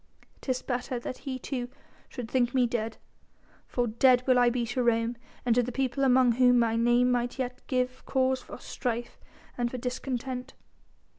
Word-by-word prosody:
'Tis 255 -2 -2
better 250 0 -2
that 255 - -6
he 260 - -2
too 250 -1 -4 0.4
should 245 -3 -6
think 245 +1 +1
me 255 -1 +4
dead, 230 -2 -2 0.7
for 245 - 0
dead 250 +2 +4
will 255 -1 +4
I 245 0 +5
be 240 0 -1
to 245 +2 -2
Rome 235 0 +1 0.3
and 240 - +4
to 245 - +4
the 245 +1 -3
people 270 +2 -1
among 255 -2 +5
whom 245 +1 +5
my 230 -1 +2
name 240 +2 +3
might 245 0 -1
yet 255 -1 -4
give 255 0 -1
cause 260 -1 +1
for - - -10
strife 240 -1 -4 0.4
and 240 0 +1
for 255 - -5
discontent. 250 +1 -4
245 Hz, 175 wpm, -28 LUFS, 240-255 Hz, 0.7 s, I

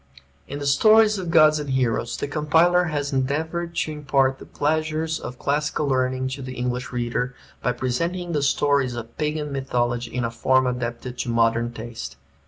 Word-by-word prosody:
In 140 - -5
the 145 - -5
"Stories 215 +8 +5
of 180 -2 -4
Gods 155 -2 +5
and 145 -1 -5
Heroes" 125 -3 0
the - - -3
compiler 160 +4 +3
has 145 -3 -2
endeavored 160 +6 -1
to 155 - -1
impart 135 -3 +1
the - - -11
pleasures 155 +1 -1
of 125 - -7
classical 145 +2 -1
learning 130 -1 0
to 135 +1 -6
the 130 0 -6
English 125 +1 -3
reader, 125 +1 -2 0.3
by 125 - 0
presenting 170 +9 -2
the 150 -3 0
stories 140 -2 +2
of 115 0 -8
Pagan 150 -1 -2
mythology 120 -3 -1
in 125 -1 -1
a 115 - -2
form 130 +2 +2
adapted 125 0 -4
to 125 - -2
modern 115 0 +2
taste. 115 - -7
135 Hz, 175 wpm, -23 LUFS, 125-155 Hz, 0.3 s, Stories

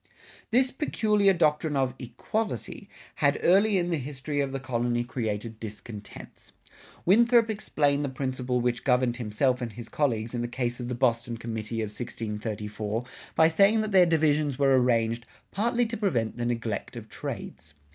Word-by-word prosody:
[62:1] - - -34 0.4
This 255 +3 +3
peculiar 210 -8 +2
doctrine 155 -2 +1
of 130 -2 +1
"equality" 205 - -4 0.3
had 140 -1 +3
early 200 +3 +5
in 175 -1 0
the 165 - 0
history 145 +2 -3
of 140 -1 -2
the 135 - -3
colony 120 -2 -1
created 110 -2 -4
discontents. 105 -1 -10 0.5
Winthrop 230 +4 +5
explained 145 -9 0
the 140 - -1
principle 130 -1 -2
which 120 0 -1
governed 125 -2 +2
himself 125 +3 0
and 115 -3 -4
his 115 +1 -9
colleagues 115 -6 -1
in 120 - -2
the 120 - -1
case 120 0 -3
of 120 - -4
the 125 - -3
Boston 120 -1 0
committee 115 0 -4
of 110 - -2
1634 105 0 -4 0.3
by 160 - +6
saying 200 +7 +4
that 215 0 -3
their 185 -2 +6
divisions 150 -4 +2
were 135 -1 +4
arranged 115 -2 +1 0.2
"partly 235 +3 +1
to 230 +1 -4
prevent 130 - 0
the 120 0 -2
neglect 115 -3 -3
of - - -8
trades." 75 -1 -7
130 Hz, 165 wpm, -27 LUFS, 115-165 Hz, 0.5 s, by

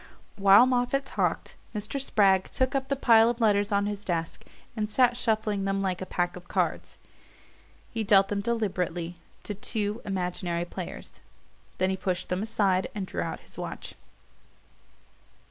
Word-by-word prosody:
While 200 +4 +7
Moffatt 255 +2 +1
talked - - -1 0.2
Mr. 210 +6 -3
Spragg 195 -7 +3
took 260 0 0
up 270 -1 -1
the 275 - 0
pile 230 -3 +5
of 240 0 -2
letters 205 -2 +2
on 200 0 +2
his 205 0 -4
desk 165 -4 -3 0.3
and 210 -2 -2
sat 245 +2 +3
shuffling 215 -4 0
them 195 0 0
like 185 -1 -2
a 185 - -5
pack 175 0 -1
of 180 -1 -11
cards. - - -2 0.9
He 225 -1 -2
dealt 195 -2 +5
them 205 -1 -1
deliberately 180 -6 -2 0.3
to 210 - -4
two 210 +2 -2
imaginary 180 -2 -2
players; - - -8 0.6
then 185 0 +1
he 190 - -2
pushed 185 -1 -2
them 180 +1 -1
aside 200 -4 +1
and 200 -2 -3
drew - - -4
out - - -4
his - - -12
watch. - - -6
205 Hz, 160 wpm, -27 LUFS, 185-225 Hz, 0.9 s, While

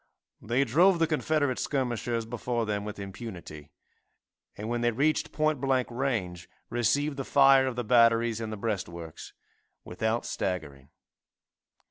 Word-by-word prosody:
They 120 +5 +1
drove 170 - +4
the 165 - +3
Confederate 155 -4 0
skirmishers 120 -4 -1
before 120 +1 -2
them 105 -1 -2
with 105 0 -6
impunity, 95 -7 -8 0.9
and 105 - -5
when 120 +1 -1
they 120 - +3
reached 140 +7 0
point 155 -3 0
blank 135 -2 +1
range 100 -9 -3 0.2
received 140 +5 +1
the 135 - -2
fire 135 -1 +5
of 130 - -3
the 125 - -2
batteries 115 0 +3
in 110 - -4
the 110 - -5
breastworks 85 -7 -5 0.5
without 110 +6 -2
staggering. 70 -8 -4
120 Hz, 135 wpm, -28 LUFS, 105-135 Hz, 0.9 s, fire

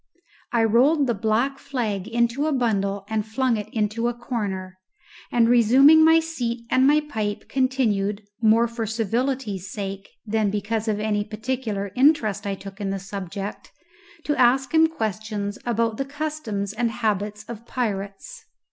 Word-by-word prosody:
I 235 -2 +2
rolled 265 +7 +4
the 240 - +1
black 230 +6 0
flag 220 -8 -3
into 235 +5 +1
a - - +1
bundle 200 -6 0
and 220 -1 -1
flung 240 +3 0
it 210 -1 -5
into 220 +1 -1
a 240 - -2
corner, 195 -7 -4 0.5
and, 235 -1 +4
resuming 260 +7 +6
my 325 +1 +6
seat 245 -8 -4
and 260 +1 +4
my 300 +1 +5
pipe, 215 -8 -4
continued, 220 -6 0 0.2
more 225 +1 +4
for 230 -1 -4
civility's 225 -2 -2
sake 195 -1 -5 0.2
than 215 -1 +1
because 210 +2 -2
of 210 -1 0
any 210 -1 0
particular 215 -2 -3
interest 250 - +3
I 200 - -1
took 195 +1 -10
in 200 - -2
the 195 - -2
subject, 195 +1 -6 0.5
to 295 - 0
ask 260 +2 +3
him 320 0 +6
questions 215 - -4
about 230 -1 0
the 275 - -2
customs 280 -9 -4
and 235 +1 0
habits 210 -2 -2
of 230 +1 -9
pirates. 210 - -4
225 Hz, 155 wpm, -24 LUFS, 205-255 Hz, 0.5 s, resuming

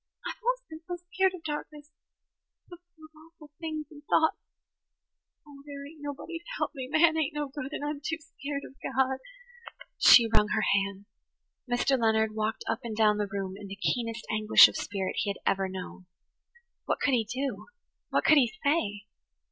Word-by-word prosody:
I've - - -5
always - - 0
been 315 0 -10
so 355 - -3
skeered 370 +2 0
of 340 - -12
darkness–it's 300 -1 -10
so - - -8 0.2
full 315 -1 -15
of 310 - -18
awful 310 -1 -17
things 310 -2 -4
and 295 -1 -12
thoughts. 320 +2 +2 1.1
Oh, 285 -2 -14
there 280 -1 -8
ain't 300 +1 -13
nobody 290 +4 -6
to 340 - -25
help - - -1
me! 260 -4 -6
Man 315 +3 +4
ain't 315 -1 -1
no 295 -1 -2
good 270 0 -6
and 290 - -4
I'm 295 -1 -4
too 320 - -2
skeered 290 -2 -6
of - - -17
God." 265 0 0 0.8
She 235 -2 +8
wrung 210 -1 +3
her 220 - +1
hands. 200 0 0 0.7
Mr. 255 +2 +2
Leonard 220 -1 +2
walked 215 +1 -2
up 225 - 0
and 225 -3 -5
down 210 -1 +4
the 205 -1 -1
room 195 -1 -3
in 200 0 -9
the 195 - -7
keenest 230 +2 -2
anguish 215 0 +8
of - - -8
spirit 195 -2 -3
he 205 - 0
had 200 - -3
ever 195 -1 +1
known. 185 -1 -8 0.8
What - - -1
could 275 - +1
he 235 -3 +3
do? 245 0 -4 0.4
What - - +1
could 310 - +7
he 240 -4 +2
say? 210 -10 0
275 Hz, 190 wpm, -29 LUFS, 215-310 Hz, 1.1 s, She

